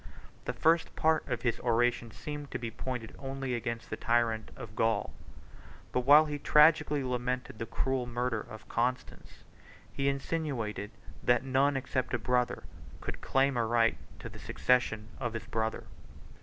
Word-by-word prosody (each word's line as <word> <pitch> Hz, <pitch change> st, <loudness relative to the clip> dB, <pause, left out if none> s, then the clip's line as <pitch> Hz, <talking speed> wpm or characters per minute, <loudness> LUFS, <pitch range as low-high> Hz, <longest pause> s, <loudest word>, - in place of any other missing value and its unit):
The -, -, -2 dB
first 165 Hz, +1 st, +2 dB
part 160 Hz, 0 st, +2 dB
of 120 Hz, -, -3 dB
his 120 Hz, -2 st, 0 dB
oration 120 Hz, 0 st, +1 dB
seemed 145 Hz, +4 st, -7 dB
to -, -, -3 dB
be 115 Hz, -1 st, -5 dB
pointed 125 Hz, -1 st, -5 dB
only 135 Hz, -1 st, -3 dB
against 115 Hz, 0 st, -4 dB
the -, -, -1 dB
tyrant 115 Hz, -2 st, +1 dB
of 105 Hz, -1 st, -9 dB
Gaul; 110 Hz, -2 st, +1 dB, 0.8 s
but -, -, +1 dB
while 150 Hz, +2 st, +9 dB
he 145 Hz, -1 st, -4 dB
tragically 150 Hz, -1 st, +5 dB
lamented 125 Hz, -2 st, -2 dB
the 115 Hz, -, -3 dB
cruel 130 Hz, +1 st, -1 dB
murder 120 Hz, -2 st, -1 dB
of 110 Hz, -3 st, -11 dB
Constans, 125 Hz, +2 st, -3 dB, 0.5 s
he 140 Hz, 0 st, +1 dB
insinuated, 135 Hz, -8 st, -2 dB, 0.3 s
that 120 Hz, 0 st, +3 dB
none, 135 Hz, +1 st, +2 dB
except 130 Hz, -1 st, -1 dB
a -, -, +1 dB
brother, 125 Hz, +1 st, 0 dB, 0.4 s
could -, -, -6 dB
claim 135 Hz, 0 st, +2 dB
a 120 Hz, -, +2 dB
right 115 Hz, 0 st, +3 dB, 0.2 s
to -, -, -8 dB
the -, -, -11 dB
succession 110 Hz, -4 st, +1 dB
of 120 Hz, -3 st, -2 dB
his 115 Hz, -, -5 dB
brother. 110 Hz, 0 st, -2 dB
125 Hz, 155 wpm, -31 LUFS, 115-135 Hz, 0.8 s, while